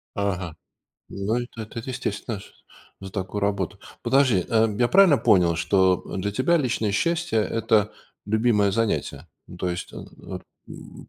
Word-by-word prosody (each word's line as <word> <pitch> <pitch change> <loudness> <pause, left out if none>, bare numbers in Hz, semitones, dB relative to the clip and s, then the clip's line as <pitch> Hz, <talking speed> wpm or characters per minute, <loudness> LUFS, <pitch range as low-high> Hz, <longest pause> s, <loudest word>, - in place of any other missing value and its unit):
Ага. 95 -5 -2 0.5
Ну, 100 +4 -2
это 120 -2 -5 0.2
это 120 +3 -5
естественно 110 -4 -4
ш - - -15 0.5
за 95 -1 -8
такую 95 0 -4
работу. 100 -3 -1 0.2
Подожди, 130 -9 +3
э, 110 -1 +3
я 120 -1 +3
правильно 185 -7 +6
понял, 90 -7 +4
что 90 +3 +3 0.2
для 100 +2 -2
тебя 130 +11 +2
личное 115 -7 0
счастье- 170 +1 0
это 105 -1 +1 0.3
любимое 110 -2 +2
занятие? 115 +1 -1 0.2
Ну, 90 - -11
то 90 - -2
есть, 85 - -5
э - - -10
э, - - -5
м - - -9 0.3
м, - - -12
105 Hz, 155 wpm, -24 LUFS, 95-120 Hz, 0.5 s, правильно